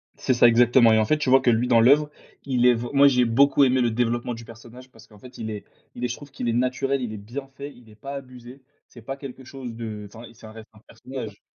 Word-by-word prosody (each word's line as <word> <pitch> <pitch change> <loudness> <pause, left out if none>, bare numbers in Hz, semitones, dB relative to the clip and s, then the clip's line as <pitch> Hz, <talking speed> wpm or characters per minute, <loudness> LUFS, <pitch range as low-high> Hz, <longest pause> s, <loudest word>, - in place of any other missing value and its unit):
C'est 130 - -1
ça, 120 0 +5
exactement, 120 0 +5
et 110 - +4
en 110 - +2
fait, 155 - +1
tu 150 -3 -2
vois? 135 0 +6
Que 130 - +2
lui, 120 +1 +1
dans 120 -2 +4
l'oeuvre, 145 +5 +4 0.4
il 125 -2 +2
est 125 - +6
vrai 120 +1 -6
moi 140 0 +6
j'ai 125 -3 +3
beaucoup 140 +5 +3
aimé 130 -1 +2
le 120 - +2
développement 120 +1 -2
du 115 0 -11
personnage 120 +3 -14
parce 115 -1 -18
qu'en 105 - -19
fait, 125 +5 -14
il 110 -1 -5
est 105 -2 -6 0.3
il 120 - -7
est, - - 0
je 120 - -5
trouve 145 - -14
qu'il 130 -2 -6
est 115 - 0
naturel, 130 +2 -1
il 120 -3 -5
est - - -7
bien 120 +7 -8
fait, 140 +1 -10
il 120 -2 -19
est 105 - -17
pas 135 +6 -9
abusé. 130 -1 -11 0.3
C'est 120 - -15
pas 135 +5 -7
quelque 135 -1 -10
chose 130 -2 -9
de, 110 -2 -7
enfin, 110 +3 -13
c'est - - -18
ça 110 - -11
reste 110 0 -13
un 110 - -18
personnage. 120 -6 -9
125 Hz, 280 wpm, -23 LUFS, 115-135 Hz, 0.4 s, vois